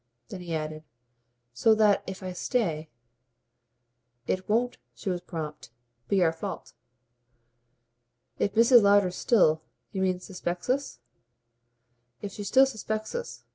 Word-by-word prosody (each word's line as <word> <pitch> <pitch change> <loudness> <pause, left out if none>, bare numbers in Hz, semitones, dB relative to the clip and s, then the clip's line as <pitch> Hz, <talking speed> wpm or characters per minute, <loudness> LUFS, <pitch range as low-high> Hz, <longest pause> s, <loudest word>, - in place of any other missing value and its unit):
Then 185 - -7
he 170 -2 -4
added: 155 0 -4 0.7
"So 220 - +4
that 210 -2 +4
if 190 0 -7
I 185 -1 -4
stay 170 -7 -1 0.7
" 120 0 -50
"It 185 +1 -6
won't" 240 +3 +1 0.2
she 195 - -3
was 175 -1 -3
prompt 155 -6 -6 0.4
"be 195 -2 +3
our 165 -1 +3
fault." 165 - -6 1.7
"If 200 - 0
Mrs. 235 +2 +7
Lowder 200 -2 +4
still, 175 -5 +3 0.3
you 190 - -3
mean, 185 -1 +1
suspects 180 +2 -3
us?" 275 - -2 1.2
"If 200 - -6
she 205 - -7
still 265 +6 +5
suspects 220 -3 -4
us. 485 0 -6
185 Hz, 135 wpm, -27 LUFS, 160-215 Hz, 1.7 s, Mrs